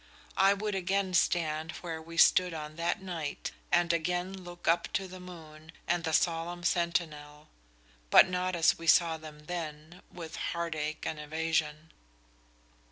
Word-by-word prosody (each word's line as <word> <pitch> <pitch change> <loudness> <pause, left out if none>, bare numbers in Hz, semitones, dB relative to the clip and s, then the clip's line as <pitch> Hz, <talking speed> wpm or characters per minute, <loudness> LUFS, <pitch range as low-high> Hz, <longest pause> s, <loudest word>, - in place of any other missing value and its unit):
I 195 +1 +6
would 210 +1 -3
again 190 0 0
stand 160 -3 +1
where 165 -2 -4
we 165 +1 -10
stood 180 0 +5
on 155 -1 -6
that 170 +3 -1
night 165 -6 -4 0.2
and 175 -1 +3
again 180 +3 -1
look 175 -2 -10
up 170 +1 +2
to 195 - -1
the 185 0 -10
moon 160 -3 -12 0.2
and 175 -1 +1
the 160 - -1
solemn 170 +2 0
sentinel, 155 -4 -1 0.6
but - - +8
not 185 0 -1
as 165 -1 +3
we 165 - -7
saw 165 0 +5
them 150 -1 -12
then, 165 0 -6
with 165 -2 -8
heartache 155 -3 -3
and 155 - -3
evasion." 155 0 -2
170 Hz, 150 wpm, -30 LUFS, 155-180 Hz, 0.6 s, but